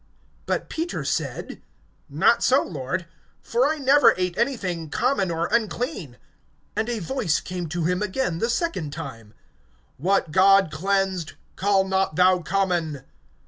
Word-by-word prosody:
(14)But - - -1
Peter 330 +2 -4
said: - - -3 0.5
Not - - +3
so, - - +4
Lord; - - -4 0.3
for 485 +1 +1
I 315 - -1
never 280 +1 +5
ate 180 -1 -1
anything 185 - -2
common 235 - 0
or 165 0 -1
unclean. 220 - -2 0.6
(15)And 220 +2 -1
a 240 - -1
voice 205 - -1
came 180 -3 -5
to 175 +1 -2
him 180 +3 0
again, 200 -4 -1
the 230 - 0
second 235 - -2
time: 110 -2 -8 0.6
What 180 +1 +1
God 195 0 +5
cleansed, 190 +1 -1 0.2
call 195 0 +2
not 190 -4 0
thou 185 +1 +4
common. 175 -6 -1
190 Hz, 140 wpm, -24 LUFS, 170-230 Hz, 0.6 s, never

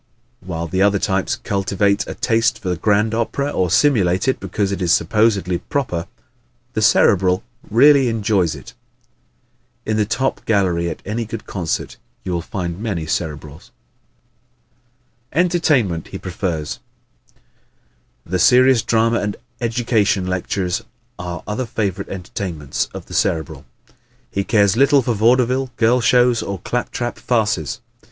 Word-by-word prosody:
While 85 -2 -5
the 95 +3 -1
other 100 0 +4
types 95 -1 0
cultivate 100 +1 0
a - - -6
taste 115 -1 +1
for 90 -2 -2
grand 105 +4 +1
opera 140 +5 -1
or 90 -1 0
simulate 95 - +2
it 130 - +1
because 95 +1 -2
it 100 -1 -3
is 90 -2 +1
supposedly 100 -1 +2
proper, 90 -8 -3 0.7
the 110 - -1
Cerebral 95 -4 +4 0.3
really 135 +3 +5
enjoys 100 -7 +1
it. - - -12 1.1
In 110 0 0
the 105 - +2
top 135 +4 -1
gallery 90 -5 +1
at - - -7
any 115 +3 -2
good 115 0 -7
concert 90 -5 -3 0.3
you 95 - -4
will 85 -1 -1
find 85 -1 -5
many 100 -8 -3
Cerebrals. 75 -2 -4 1.6
Entertainment 150 - +1
He - - -7
Prefers 80 -8 -4 0.5
¶ - - -35 0.9
The 90 +2 -2
serious 125 +5 +5
drama 115 +1 +2
and 105 -1 -3 0.2
educational 115 -5 +1
lectures 90 0 -1 0.4
are 90 -1 -5
other 110 +4 -3
favorite 100 -4 -3
entertainments 90 -5 -4
of - - -8
the - - -12
Cerebral. 80 -4 -1 0.7
He 100 - -1
cares 100 -2 +3
little 140 +2 +4
for 120 - 0
vaudeville, 125 +4 +2
girl 120 +2 +3
shows, 120 0 +3
or 100 - -4
clap 120 +7 -3
trap 120 0 -4
farces. 105 - -1
100 Hz, 135 wpm, -19 LUFS, 90-115 Hz, 1.6 s, really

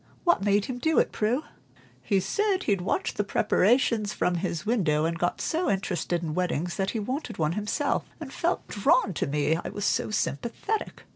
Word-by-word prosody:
What 345 - +3
made 200 0 +2
him 245 -1 -5
do 315 +4 +1
it, - - +3
Prue?" 240 +8 0 0.6
"He 200 -3 +1
said 385 - 0
he'd 200 -4 +1
watched 180 - -1
the 205 - +2
preparations 215 +1 +2
from 180 - +1
his 170 -3 -3
window, 170 -10 +2
and 165 +1 -2
got 175 - 0
so 340 +3 0
interested 180 -3 -1
in 155 -2 -3
weddings 175 -1 -1
that 195 0 0
he 225 - -2
wanted 260 +9 -4
one 155 -1 +1
himself, 210 - -1
and - - -8
felt - - -1
drawn 250 - +2
to - - -1
me 150 +3 +1
I - - -4
was 205 - -4
so - - +1
sympathetic. 235 - -2
205 Hz, 190 wpm, -27 LUFS, 175-245 Hz, 0.6 s, What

